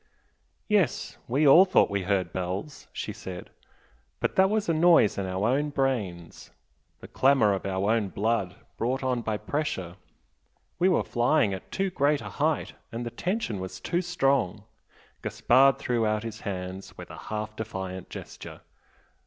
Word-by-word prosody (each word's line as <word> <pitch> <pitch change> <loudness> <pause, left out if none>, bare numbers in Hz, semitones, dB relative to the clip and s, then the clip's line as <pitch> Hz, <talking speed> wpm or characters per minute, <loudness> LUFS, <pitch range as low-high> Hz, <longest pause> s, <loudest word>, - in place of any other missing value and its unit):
"Yes 205 -6 +1
we 140 +5 +2
all 165 +7 +9
thought 185 - +3
we 100 -1 0
heard 95 0 -1
bells" 95 +10 -4
she - - -5
said 90 -1 -8 0.7
"But - - -1
that 190 0 +5
was 215 0 0
a 165 - +2
noise 160 - +5
in 95 - -2
our 95 +3 -1
own 145 +4 +1
brains 110 - -2 0.5
the - - -9
clamour 130 -6 +3
of 95 0 -3
our 95 +2 0
own 110 -4 +1
blood 105 -2 -1 0.2
brought 130 +4 -1
on 125 -2 0
by 110 -2 -2
pressure 105 - -3 0.8
we 180 +2 +4
were 180 - +2
flying 120 -3 +2
at 95 - -8
too 195 -1 -1
great 145 -2 +2
a - - -7
height 155 0 -1 0.2
and 120 +1 -4
the 120 - -4
tension 180 - -2
was 95 0 -6
too 175 - -1
strong 135 - 0 0.3
" - - -30
Gaspard 135 +2 +4
threw 120 -4 0
out 105 0 0
his 110 -1 -6
hands 95 -1 -6
with - - -9
a - - -9
half 110 0 -4
defiant 95 -4 -6
gesture. - - -9
115 Hz, 165 wpm, -27 LUFS, 100-145 Hz, 0.8 s, all